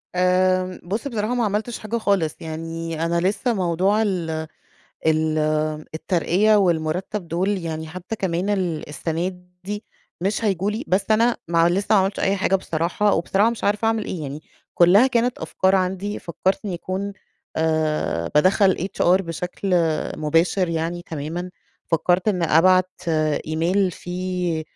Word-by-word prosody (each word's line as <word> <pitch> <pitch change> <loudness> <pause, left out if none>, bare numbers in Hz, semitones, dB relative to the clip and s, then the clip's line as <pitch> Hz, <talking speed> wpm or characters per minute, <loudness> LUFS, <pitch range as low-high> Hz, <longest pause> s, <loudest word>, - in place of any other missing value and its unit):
آمم، 185 0 +2
بُص 210 +9 -3
بصراحة 225 -2 -2
ما 240 - +1
عملتش 215 +3 -2
حاجة 220 +2 -3
خالص. 195 -8 +1
يعني 165 0 -4
أنا 170 0 +1
لسّه 205 +7 0
موضوع 190 +2 +1
ال 185 -6 -1 0.8
ال 155 0 +2 0.6
الترقية 185 +5 +2
والمُرتَّب 175 +1 0
دول 190 +5 0
يعني 160 -2 -4
حتّى 185 +6 -6
كمان 185 0 -1 0.4
السَنة 165 +4 -2 0.4
دي 205 +2 -5 0.4
مش 200 +5 -1
هييجوا 195 -1 +1
لي، 220 +5 -4
بس 195 +3 0
أنا 230 +2 +4
ما 170 0 +4
لسّه 195 +4 +1
ما 200 - +6
عملتش 195 +2 -1
أي 195 +1 +2
حاجة 190 0 +1
بصراحة 175 +4 0
وبصراحة 195 +6 +2
مش 235 - -6
عارفة 210 +2 +1
أعمل 225 -1 +1
إيه؟ 170 - -5
يعني 145 +1 -5 0.3
كُلّها 190 +8 +6
كانت 245 -1 +1
أفكار 190 +1 +1
عندي، 190 +2 -2
فكّرت 185 +5 -2
إن 205 - -3
يكون 190 +3 -4 0.4
أ 155 - 0
بادخّل 190 +5 +4 0.3
HR 185 +2 +4
بشكل 180 +3 -4 0.4
مباشر 165 +4 +1
يعني 165 +1 -2
تمامًا. 165 +3 -5 0.3
فكّرت 175 +4 +1
إن 185 -5 +1
أبعت 185 +3 +4 0.6
إيميل 175 +5 +1
فيه 180 -2 -3
185 Hz, 140 wpm, -22 LUFS, 165-200 Hz, 0.8 s, ما